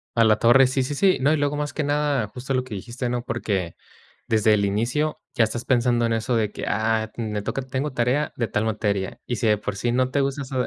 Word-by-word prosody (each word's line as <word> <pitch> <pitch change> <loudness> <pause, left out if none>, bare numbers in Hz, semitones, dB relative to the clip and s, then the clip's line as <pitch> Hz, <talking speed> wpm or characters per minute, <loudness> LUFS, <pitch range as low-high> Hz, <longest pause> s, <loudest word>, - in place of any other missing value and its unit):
A 115 - +5
la 110 -1 +4
torre, 130 +3 +6
sí, 130 0 0
sí, 145 +2 -3
sí. 190 +3 +3
No, 145 +3 +3
y - - +2
luego, 145 0 0
más 145 0 -3
que 155 - -2
nada, 145 -5 0
justo 130 +4 -5
lo 130 0 +1
que 125 -4 -9
dijiste, 120 +5 -5
¿no?, 120 -1 -2
porque 95 -8 -2 0.5
desde 110 -1 +3
el 100 -1 +2
inicio 120 +10 -1 0.2
ya 115 - +4
estás 115 +2 -4
pensando 120 -1 +2
en 115 - 0
eso 115 +2 0
de 105 -2 0
que, - - -6
ah, 110 +1 0
me 105 -3 -3
toca 135 - -3
tengo 130 +2 -3
tarea 125 +5 0
de 115 -2 -1
tal 105 +1 -1
materia. 100 -3 -2
Y 120 - -2
si 115 - 0
de 105 -1 +4
por 105 - -4
sí 120 +3 0
no 130 +1 +1
te 140 - +1
gusta 140 +1 -1
eso 130 0 -5
120 Hz, 255 wpm, -23 LUFS, 110-135 Hz, 0.5 s, torre